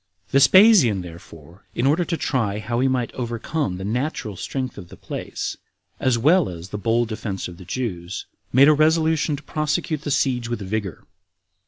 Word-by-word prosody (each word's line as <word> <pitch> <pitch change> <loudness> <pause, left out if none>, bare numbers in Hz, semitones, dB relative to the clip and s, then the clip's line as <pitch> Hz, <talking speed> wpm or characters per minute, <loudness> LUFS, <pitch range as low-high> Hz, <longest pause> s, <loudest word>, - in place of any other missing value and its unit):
8. - - -28
Vespasian, 140 - +6
therefore, 85 0 -13
in 120 - 0
order 155 +6 +3
to 170 -1 -2
try 115 -10 -1
how 120 +3 -2
he 130 - +3
might 125 -2 -1
overcome 120 - -3
the 95 - -6
natural 120 -2 -2
strength 130 +6 -4
of 90 -3 -11
the - - -13
place, - - -5 0.4
as 130 -2 +2
well 155 - +3
as 85 +1 -8
the 105 - -5
bold 115 +2 +1
defense 110 -3 -4
of 90 -1 -11
the 90 - -12
Jews, 100 -6 -4 0.3
made 135 +3 +6
a 155 - +7
resolution 160 0 +2
to 145 - -10
prosecute 155 0 -2
the 150 - -5
siege 125 -4 0
with 120 - -2
vigor. 100 -2 -4
120 Hz, 180 wpm, -22 LUFS, 100-145 Hz, 0.4 s, a